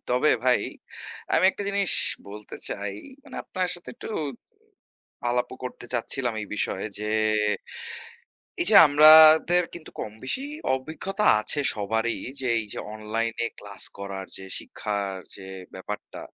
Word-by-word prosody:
তবে 125 +5 +2
ভাই, 125 -1 +3 0.7
আমি 175 - +3
একটা 205 - -7
জিনিস 200 -2 +4 0.4
বলতে 105 +1 -10
চাই। 100 -1 -5 0.3
মানে - - -11
আপনার 185 -1 -3
সাথে 175 - -9
একটু 235 - -10 1.2
আলাপও 125 +1 -2
করতে 125 -1 -7
চাচ্ছিলাম 120 0 -1
এই 105 - -7
বিষয়ে 95 -1 -1
যে, 105 - -4 1.6
এই - - +3
যে - - +4
আমাদের 155 +3 +7
কিন্তু 170 -2 -10
কমবেশি 120 - -4 0.3
অভিজ্ঞতা 160 +10 -4 0.2
আছে 145 +7 +1
সবারই 110 +3 -2 0.2
যে, 130 - -3
এই 110 - -3
যে - - -5 0.2
অনলাইনে 115 +2 -3
ক্লাস 100 -1 -2
করার 100 -1 -6
যে 95 - -8
শিক্ষার 100 -2 -4 0.2
যে 95 - -11 0.3
ব্যাপারটা, 105 +2 -8
120 Hz, 130 wpm, -25 LUFS, 105-155 Hz, 1.6 s, আমাদের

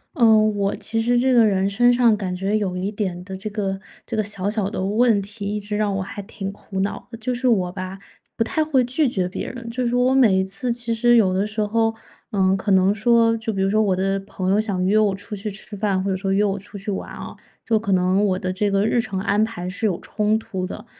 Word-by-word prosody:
呃， 225 -5 +6
我 205 -2 +1
其 225 +1 -2
实 240 +2 +2
这 260 +2 +3
个 235 -2 +6
人 195 -2 +2
身 240 +5 +3
上 240 -2 +4
感 190 -3 -3
觉 195 +3 -1
有 195 -4 -1
一 190 +3 -2
点 185 -4 -3
的 190 0 -7
这 210 +3 -5
个 195 -2 -3 0.3
这 235 - -4
个 215 - +2
小 200 -2 -3
小 205 -2 0
的 205 -2 -3
问 215 +2 +3
题， 205 +1 -6
一 - - -1
直 210 +1 -4
让 205 -1 0
我 195 - -1
还 205 +2 -7
挺 195 -1 -6
苦 200 -1 -7
恼 200 - -3
的。 230 - -9
就 245 +3 -2
是 250 +1 -1
我 190 -7 +2
吧， 185 0 -6 0.4
不 - - +2
太 310 +7 0
会 285 -5 +2
拒 260 +4 +1
绝 185 -6 0
别 180 - -5
人， 245 -2 -9
就 250 +1 -1
是 240 - 0
我 250 +1 +3
每 235 -8 +5
一 190 - +2
次 200 +6 -2
其 235 -1 -1
实 240 +1 +4
有 200 -5 +4
的 195 +3 0
时 215 +1 -6
候， 225 +1 +1 0.3
呃， 190 -3 +2
可 195 +2 -4
能 190 +1 +4
说， 230 +1 +3
就 225 0 -3
比 195 - -4
如 195 - +1
说 215 +1 +3
我 200 -3 +2
的 195 +1 0
朋 190 -1 -3
友 205 +2 +3
想 195 -4 -1
约 205 +3 +3
我 205 -3 +2
出 205 +2 -7
去 205 +2 -4
吃 205 +1 -8
饭， 195 -2 0
或 195 - -1
者 190 - 0
说 195 +1 -2
约 200 +2 +3
我 200 -1 0
出 200 +1 -10
去 200 +1 -4
玩 190 - -5
哦， - - -8 0.3
就 220 -2 +2
可 205 -2 -3
能 185 +2 +2
我 190 -3 +1
的 185 0 -3
这 205 +2 0
个 195 +1 +1
日 235 +2 +2
程 215 -5 -4
安 205 +2 +2
排 220 -5 -4
是 200 +4 -1
有 180 -5 -2
冲 215 0 0
突 190 -4 -5
的， - - -8
205 Hz, 285 characters per minute, -22 LUFS, 195-225 Hz, 0.4 s, 呃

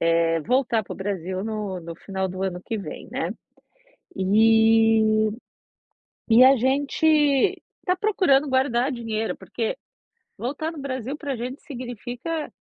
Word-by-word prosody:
eh, 165 0 +2
voltar 240 - +1
pro - - -8
Brasil 190 -1 -3
no 210 -4 -4
no 170 -1 -8
final 190 +2 -3
do 185 +1 -6
ano 180 -2 -3
que 225 - -3
vem, 200 - -7
né. - - -2 0.8
E, 220 +1 +4 1.0
e 230 +2 +7
a 265 +1 +7
gente 275 +5 0 0.8
está 365 - +1
procurando 365 -8 +2
guardar 260 0 +1
dinheiro 225 -3 -3
porque, 470 +2 -3 0.6
voltar 285 +6 -3
no 320 - -10
Brasil 265 -1 -4
pra 290 -3 -4
gente 250 +4 -6
significa 250 +4 -5
230 Hz, 130 wpm, -24 LUFS, 210-270 Hz, 1.0 s, e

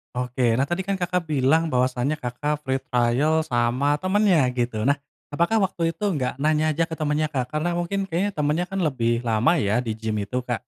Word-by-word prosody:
Oke. 125 +1 -2 0.2
Nah, 140 - +1
tadi 175 +3 -2
kan 195 0 -2
Kakak 180 0 0
bilang 155 +2 +2
bahwasanya 130 +4 0
Kakak 145 +4 -2
free 130 0 -1
trial 125 +6 +2
sama 125 +4 +1
temennya 185 -2 +3
gitu. 120 -3 -2
Nah, 140 +2 +2 0.3
apakah 170 +8 +2
waktu 165 -3 -1
itu 210 - -9 0.2
gak 125 -1 -2
nanya 155 +2 +1
aja 165 - +2
ke 165 -1 -4
temennya, 155 0 0
Kak? 130 -3 -1
Karena 155 +5 -2
mungkin 175 +3 -1
kayaknya 190 +2 -2
temennya 150 +4 0
kan 195 -2 -2
lebih 120 -5 0
lama 115 +9 +2
ya 110 -5 +1
di 115 -3 -3
gim 110 -1 -3
itu, 125 +5 -3
Kak. 120 -1 -3
145 Hz, 195 wpm, -24 LUFS, 125-170 Hz, 0.3 s, temennya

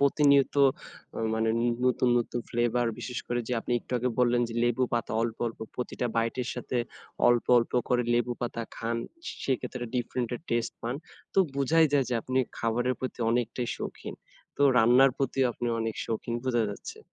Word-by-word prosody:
প্রতিনিয়ত 140 -1 +4 0.6
আ - - -3 0.2
মানে 110 0 +1 0.4
নতুন, 125 0 +2
নতুন 120 0 -2
ফ্লেভার 120 0 +1
বিশেষ 125 -2 -4
করে 120 0 0
যে - - -1
আপনি 120 - -3
একটু - - -11
আগে 125 - 0
বললেন 120 -1 +3
যে 115 - -7
লেবুপাতা 120 -1 0
অল্প, 115 -1 -2
অল্প 115 - -5 0.2
প্রতিটা 125 0 -3
বাইটের 115 +2 0
সাথে 125 0 -3 0.5
অল্প, 120 -1 +3
অল্প 115 - -1 0.2
করে 125 0 +3
লেবুপাতা 120 -1 -1
খান 115 +1 -2 0.5
সেক্ষেত্রে 125 -2 -2
ডিফারেন্টের 120 0 -2
টেস্ট 115 0 0
পান। 120 +2 -3 0.4
তো - - +3 0.2
বুঝাই 155 +4 +4
যায় 140 -2 +4
যে, 125 - -1
আপনি 130 0 -1 0.2
খাবারের 120 +2 0
প্রতি 130 - -4
অনেকটাই 120 0 -1
শৌখিন। - - -6 0.4
তো 145 - +1
রান্নার 125 +3 +6
প্রতিও 135 0 +1
আপনি 120 - -4
অনেক 115 -1 -2
শৌখিন 115 +1 -3
বোঝা 120 -3 +2
যাচ্ছে। 100 - -8
120 Hz, 160 wpm, -28 LUFS, 115-130 Hz, 0.6 s, রান্নার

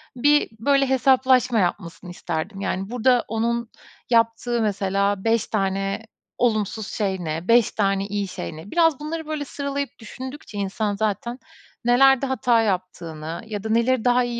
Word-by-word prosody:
bir 290 +4 +3
böyle 275 +3 +2
hesaplaşma 260 -2 +3
yapmasını 180 -1 -2
isterdim. 175 +3 -4
Yani 195 0 -2
burada 245 0 +2
onun 230 +1 -1 0.4
yaptığı 230 0 +2
mesela 200 -1 0
5 225 -1 +1
tane 195 +1 -1 0.3
olumsuz 215 -2 0
şey 195 -3 -2
ne? 165 +1 -4
5 235 -1 +5
tane 195 -2 0
iyi 205 -1 -2
şey 85 - -6
ne? 165 +6 -11
Biraz 325 -4 +3
bunları 315 +1 -5
böyle 305 -2 -3
sıralayıp 280 0 -3
düşündükçe 255 0 -9
insan 205 +1 -1
zaten 220 +4 -2 0.5
nelerde 270 +2 +5
hata 245 -3 +2
yaptığını 170 -5 -3
ya 210 -2 -5
da 220 - -4
neleri 235 +2 +2
daha 245 0 +4
iyi 240 -1 -3
225 Hz, 145 wpm, -23 LUFS, 195-250 Hz, 0.5 s, 5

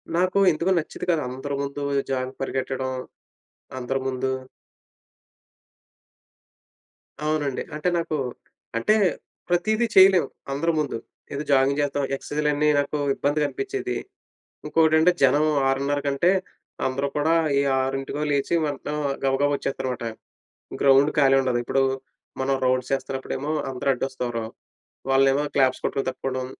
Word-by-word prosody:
నాకు 185 +2 +2
ఎందుకో 170 +4 0
నచ్చేది 155 - -6
కాదు 165 -3 +2
అందరి 135 +3 -4
ముందు 140 +1 -4 0.3
జాగింగ్‌కి 130 0 -2
పరిగెత్తడం 130 0 -2 0.9
అందరి 135 +2 -2
ముందు. 130 0 -1 2.9
అవునండి. 150 -3 -1
అంటే 155 +4 0
నాకు 165 -2 -2 0.6
అంటే 165 - +3 0.5
ప్రతీదీ 215 +7 +2
చేయలేము 190 -2 +7 0.2
అందరి 155 +5 +1
ముందు. 145 -6 -1 0.4
ఏదో 140 +1 -3
జాగింగ్ 135 +1 +3
చేస్తాం. 145 0 -1
ఎక్సర్సైజ్లన్నీ 150 +1 0
నాకు 145 +1 -1 0.2
ఇబ్బందిగా 145 +1 +1
అనిపించేది. 390 - -3 0.7
ఇంకోకటంటే 160 +1 +4
జనం 145 +3 +5 0.2
6:30 140 +2 +1
కంటే 140 +6 +3 0.6
అందరూ 135 +2 -1
కూడా 150 +2 +2 0.3
ఏ - - +3 0.2
6కో 135 +2 -2
లేచి 140 +3 0
వెంటనే 145 0 -4 0.3
గబగబా 135 +2 +2
వచ్చేస్తారనమాట. 130 -3 -3 0.8
గ్రౌండ్ 140 +2 +5
ఖాళీ 135 -2 +5
ఉండదు. 125 -2 0
ఇప్పుడు 135 +2 +1 0.6
మనం 135 +1 +1
రౌండ్స్ 130 0 +1
చేస్తున్నప్పుడేమో 135 +2 -3 0.2
అందరూ 130 +1 -2
అడ్డొస్తారు. 125 -3 -3 0.6
వాళ్ళనేమో 135 +1 +4
క్లాప్స్ 130 -2 +3
కొట్టడం 135 - -1
తప్పుకోవడం 130 0 -3
140 Hz, 115 wpm, -24 LUFS, 135-150 Hz, 2.9 s, చేయలేము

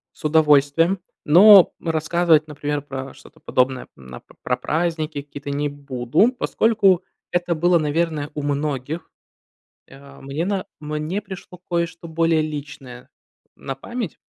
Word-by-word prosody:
С - - -20
удовольствием, 155 +3 +3 0.2
но, 190 +4 +8
м, - - -7
рассказывать, 160 0 +2
например, 145 -1 -3
про 135 -1 -7
что-то - - -18
подобное, 130 0 0
м, 65 -2 -13
а, - - -8
по - - -22
про - - 0
праздники 160 -2 -2
какие-то 145 0 -9
не 145 +1 -1
буду, 140 - 0
поскольку 210 -7 +2 0.3
это 175 -1 0
было, 175 +2 +3
наверное, 155 -1 -1
у 150 - -4
многих. 145 +1 -3 0.8
Э, 140 0 -15
мне 140 +4 -3
на 195 -2 -2
мне 155 +5 -3
пришло 190 -3 -10
кое-что 170 -1 -2
более 165 -1 +2
личное 145 -4 -8 0.5
на 135 - -6
память. 225 - -6
155 Hz, 140 wpm, -21 LUFS, 140-170 Hz, 0.8 s, но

